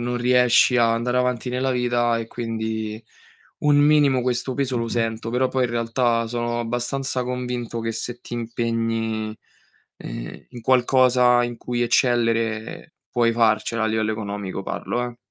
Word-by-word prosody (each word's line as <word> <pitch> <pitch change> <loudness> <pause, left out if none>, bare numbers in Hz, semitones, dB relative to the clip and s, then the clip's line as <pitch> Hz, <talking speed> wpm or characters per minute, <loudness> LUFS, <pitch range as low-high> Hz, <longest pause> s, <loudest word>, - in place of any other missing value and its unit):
non 120 +1 -2
riesci 125 0 +4
ad 115 -1 +4
andare 120 +2 0
avanti 125 0 -1
nella 130 +1 0
vita 120 -1 +1
e 115 -1 -4
quindi 110 -2 -4 0.6
un 145 -1 +3
minimo 145 -3 +4
questo 125 +1 -1
peso 130 -3 -1
lo 115 - -2
sento. 115 -1 -2
Però 125 +2 +1
poi 130 -1 0
in 120 - -2
realtà 115 0 0
sono 120 0 -2
abbastanza 120 +3 -2
convinto 125 -2 -4
che 115 0 -2
se 120 +2 -5
ti - - -12
impegni, 115 -2 -2 0.6
ehm, - - -8
in 120 -2 -9
qualcosa 125 0 +4
in 120 -1 -5
cui 120 -1 -2
eccellere 115 -2 0 0.2
puoi 120 -1 +2
farcela 115 0 +1
a - - +2
livello 110 0 0
economico 100 -3 -5
parlo, 120 +5 -3
eh. 120 -1 -7
120 Hz, 155 wpm, -23 LUFS, 115-125 Hz, 0.6 s, riesci